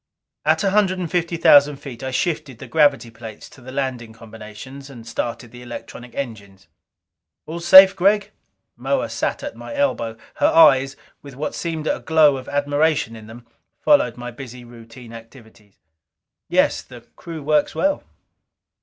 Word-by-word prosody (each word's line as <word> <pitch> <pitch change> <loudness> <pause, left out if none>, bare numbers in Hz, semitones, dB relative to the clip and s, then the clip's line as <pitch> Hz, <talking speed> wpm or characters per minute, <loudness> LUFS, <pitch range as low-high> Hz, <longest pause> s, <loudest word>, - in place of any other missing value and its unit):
At - - +2
a 195 - +1
hundred 195 -2 +2
and 175 -3 -5
fifty 170 -1 -1
thousand 145 -2 +6
feet 135 -3 -10
I 130 - -4
shifted 150 -1 -2
the - - -10
gravity 145 -6 +2
plates 110 -1 -11
to 130 - -17
the 130 +1 -10
landing 130 -4 -4
combinations, 115 +5 -11
and 120 -4 -12
started 120 0 -5
the 125 0 -12
electronic 120 0 -10
engines. 100 -7 -7 0.8
"All 165 +2 -6
safe, 190 +3 +8
Gregg?" 200 +3 +2 0.4
Moa - - -2
sat - - -3
at - - -6
my 290 - -9
elbow; 115 - -1 0.2
her 295 - +3
eyes, 135 - +5 0.3
with 140 -3 -12
what 150 +3 -4
seem 160 -3 -4
a - - -1
glow 155 -3 +3
of 130 - -9
admiration 145 -3 0
in 110 -1 -12
them, 115 +2 -13 0.3
followed 290 - +3
my 120 0 -7
busy 125 0 -10
routine 120 0 -14
activities. 115 -3 -15 0.7
"Yes. - - +2
The - - -14
crew 165 -3 -9
works 150 0 +1
well." 290 0 0
135 Hz, 160 wpm, -21 LUFS, 115-160 Hz, 0.8 s, safe